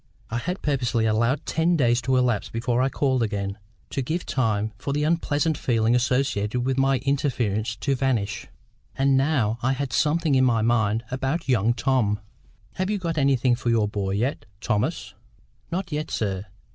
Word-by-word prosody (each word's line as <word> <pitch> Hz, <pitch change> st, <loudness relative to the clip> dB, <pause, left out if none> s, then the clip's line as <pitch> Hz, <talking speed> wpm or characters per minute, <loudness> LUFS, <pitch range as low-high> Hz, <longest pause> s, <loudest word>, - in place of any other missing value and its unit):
I 115 Hz, -, -1 dB
had 180 Hz, +9 st, -4 dB
purposely 125 Hz, -5 st, +1 dB
allowed 115 Hz, +6 st, +1 dB
ten 165 Hz, +1 st, +1 dB
days 120 Hz, -3 st, +3 dB
to 130 Hz, +2 st, +1 dB
elapse 125 Hz, -4 st, +1 dB
before 120 Hz, +2 st, 0 dB
I 130 Hz, -, +2 dB
called 130 Hz, -2 st, 0 dB
again, 100 Hz, -2 st, -2 dB, 0.3 s
to 135 Hz, -, -1 dB
give 160 Hz, +8 st, -3 dB
time 110 Hz, -4 st, 0 dB
for 140 Hz, +7 st, -3 dB
the 150 Hz, +1 st, 0 dB
unpleasant 155 Hz, -1 st, +1 dB
feelings 115 Hz, 0 st, +2 dB
associated 125 Hz, -3 st, 0 dB
with 130 Hz, +1 st, 0 dB
my 135 Hz, 0 st, +3 dB
interference 115 Hz, -6 st, 0 dB
to 135 Hz, +6 st, -1 dB
vanish. 125 Hz, -6 st, -1 dB, 0.5 s
And 135 Hz, 0 st, +3 dB
now 130 Hz, -5 st, +1 dB
I 130 Hz, +2 st, +1 dB
had 135 Hz, -1 st, -3 dB
something 155 Hz, +3 st, +2 dB
in 130 Hz, -1 st, +4 dB
my 115 Hz, -4 st, +3 dB
mind 110 Hz, -1 st, +1 dB
about 135 Hz, +6 st, -2 dB
young 120 Hz, -2 st, +2 dB
Tom. 115 Hz, -4 st, +1 dB, 0.6 s
"Have 185 Hz, +1 st, -1 dB
you 210 Hz, -, 0 dB
got 165 Hz, -4 st, -2 dB
anything 135 Hz, -3 st, +3 dB
for 120 Hz, 0 st, -1 dB
your 115 Hz, -3 st, +3 dB
boy 100 Hz, -2 st, -2 dB
yet, 125 Hz, +8 st, -1 dB
Thomas?" 105 Hz, -2 st, -1 dB, 0.6 s
"Not 180 Hz, +1 st, -3 dB
yet, 150 Hz, +1 st, -3 dB
sir. 100 Hz, -2 st, -2 dB
125 Hz, 170 wpm, -24 LUFS, 110-140 Hz, 0.6 s, in